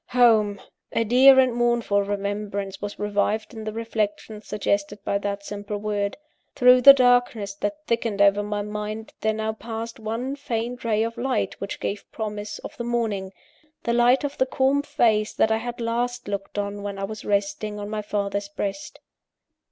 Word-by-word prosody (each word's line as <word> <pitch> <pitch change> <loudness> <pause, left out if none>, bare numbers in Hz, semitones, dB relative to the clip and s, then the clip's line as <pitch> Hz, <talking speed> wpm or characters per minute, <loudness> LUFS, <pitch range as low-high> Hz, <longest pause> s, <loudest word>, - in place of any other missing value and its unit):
Home! 220 -5 +4 0.3
A 230 - +2
dear 260 +4 +7
and 255 -1 +4
a - - -6
mournful 235 -4 +2
remembrance 200 -1 -3
was 205 0 -5
revived 210 +2 -1
in 220 -1 -7
the 215 - -2
reflections 215 -1 -3
suggested 200 0 -1
by 200 - 0
that 200 0 -3
simple 205 0 -5
word. 205 -1 -2 0.4
Through 250 0 +6
the 275 +2 +11
darkness 245 -6 +2
that 250 +11 -4
thickened 230 -5 -1
over 200 0 +5
my 205 0 -3
mind, 210 +1 -5
there 220 - +2
now 220 0 -2
passed 230 +1 -6
one 230 +5 -3
faint 245 -3 -4
ray 220 -1 +1
of 230 +1 -4
light 260 +1 -1
which 200 - -5
gave 200 0 -4
promise 210 -2 -5
of - - -9
the 235 - -3
morning 225 -5 -1 0.5
the 235 - 0
light 240 +3 +4
of 285 0 -4
the 260 - +3
calm 270 +2 +2
face 230 -8 +1
that 220 - +2
I 220 - +3
had 240 +1 -5
last 240 +1 -2
looked 200 0 -5
on 205 0 -3
when 200 -1 -5
it 195 0 -3
was 215 0 -7
resting 205 +1 -1
on 205 - -5
my 215 0 -3
father's 200 -1 -2
breast. 205 +9 -5
215 Hz, 180 wpm, -24 LUFS, 205-240 Hz, 0.5 s, the